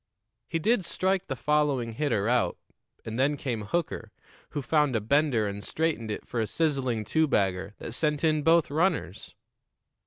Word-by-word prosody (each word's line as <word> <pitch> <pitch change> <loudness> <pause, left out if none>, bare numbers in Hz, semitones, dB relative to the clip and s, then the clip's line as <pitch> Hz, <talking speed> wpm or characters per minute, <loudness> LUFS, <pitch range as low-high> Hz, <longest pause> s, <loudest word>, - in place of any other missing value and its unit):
He 165 - -1
did 210 +5 +2
strike 190 +2 0
the 135 - -2
following 140 -4 +1
hitter 115 -6 0
out; 120 -7 +1 0.5
and 110 +2 -4
then 145 +2 +2
came 120 -6 -3
Hooker, 115 -5 -2 0.4
who 145 -2 -4
found 150 -1 +2
a - - +3
bender 130 0 +2
and 100 0 -4
straightened 155 -9 -1
it 105 - -4
for 120 - -3
a 110 - 0
sizzling 130 -9 0
two 160 +8 +2
bagger 95 -4 0
that - - -7
sent 150 +3 0
in 155 -1 +3
both 165 0 +4
runners. 170 +6 -1
140 Hz, 165 wpm, -28 LUFS, 115-155 Hz, 0.5 s, both